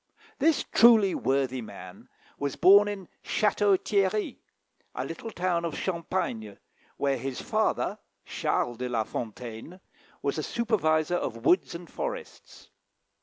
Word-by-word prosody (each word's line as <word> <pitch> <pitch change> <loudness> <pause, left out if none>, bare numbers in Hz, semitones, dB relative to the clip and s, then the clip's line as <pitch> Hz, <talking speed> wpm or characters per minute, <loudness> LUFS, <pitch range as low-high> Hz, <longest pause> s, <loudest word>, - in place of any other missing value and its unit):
This 320 0 +3
truly 225 -5 +5
worthy 130 -1 0
man 110 - -11 0.3
was 140 -1 -2
born 200 +3 +7
in 200 -3 -5 0.2
Château 205 -2 +2
Thierry, 200 +1 0 0.6
a - - -3
little 225 - -6
town 175 -4 -1
of 165 -2 -3
Champagne, 165 - -3 0.4
where 140 -1 +1
his 135 0 -4
father, - - 0 0.3
Charles 120 -1 -1
de 125 +1 -3
la 115 -2 0
Fontaine, 115 - -7 0.4
was - - -1
a - - 0
supervisor 175 -8 +1
of 115 -6 -5
woods 175 +1 +3
and 170 0 -8
forests. - - -7
170 Hz, 125 wpm, -28 LUFS, 130-205 Hz, 0.6 s, born